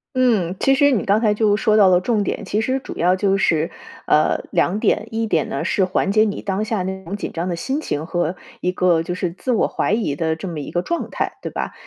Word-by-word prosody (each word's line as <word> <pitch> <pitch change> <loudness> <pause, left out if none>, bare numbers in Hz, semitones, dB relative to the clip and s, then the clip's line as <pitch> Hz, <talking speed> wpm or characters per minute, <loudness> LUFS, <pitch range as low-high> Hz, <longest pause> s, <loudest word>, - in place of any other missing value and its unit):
嗯， 215 -9 +2
其 270 - +3
实 285 +1 +4
你 250 -7 +1
刚 205 +2 +2
才 210 -3 +2
就 210 -1 +3
说 215 0 +2
到 200 -3 +6
了 180 -1 +4
重 215 0 +1
点。 205 - -3
其 210 +3 -1
实 260 +4 0
主 - - -9
要 180 +2 +3
就 195 0 +1
是， 165 -3 +1 0.4
呃， 150 - +3
2 180 +4 +1
点。 215 - +1
一 225 0 -1
点 225 - +1
呢， - - -3
是 190 - +1
缓 190 +1 0
解 215 +1 +4
你 205 -2 -2
当 200 +1 -2
下 215 -3 -1
那 190 +1 -4
种 190 +2 -5
紧 205 - -5
张 170 +2 -3
的 175 - -1
心 270 - -2
情 155 - -3
和 175 -1 -1 0.2
一 180 - 0
个 180 -3 +2
就 175 - -4
是 180 -1 -2
自 250 +8 -4
我 230 - +2
怀 - - -1
疑 215 -11 0
的 160 +1 -1
这 190 - -7
么 165 -4 -5
一 - - -7
个 175 - 0
状 340 - -3
态， - - -2
对 - - -4
吧？ - - -4
195 Hz, 275 characters per minute, -20 LUFS, 175-220 Hz, 0.4 s, 到